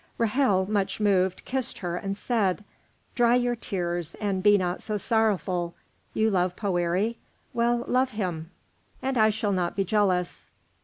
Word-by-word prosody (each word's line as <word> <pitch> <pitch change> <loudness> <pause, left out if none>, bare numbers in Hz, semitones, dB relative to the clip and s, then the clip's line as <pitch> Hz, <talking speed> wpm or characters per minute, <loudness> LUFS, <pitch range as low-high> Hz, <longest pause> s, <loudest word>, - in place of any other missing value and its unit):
Ra'hel, 215 -5 +2
much 205 -1 -1
moved, 190 -3 +1
kissed 260 -1 -2
her 175 -2 -3
and 195 +2 -3
said, 210 -4 0 0.5
"Dry 240 0 +4
your 245 -1 +1
tears 175 -6 -3
and 200 -3 -2
be 205 +1 +6
not 180 -1 -2
so 215 -1 -2
sorrowful. 195 -6 0 0.4
You 220 0 +2
love 180 -1 +1
Poëri? 190 +3 0 0.4
Well, 240 0 +1
love 255 +1 +2
him, 180 -8 -4 0.5
and 265 0 0
I 220 -2 +5
shall 210 -1 -1
not 180 -3 -1
be 195 - 0
jealous. 185 -3 0
205 Hz, 150 wpm, -26 LUFS, 180-225 Hz, 0.5 s, be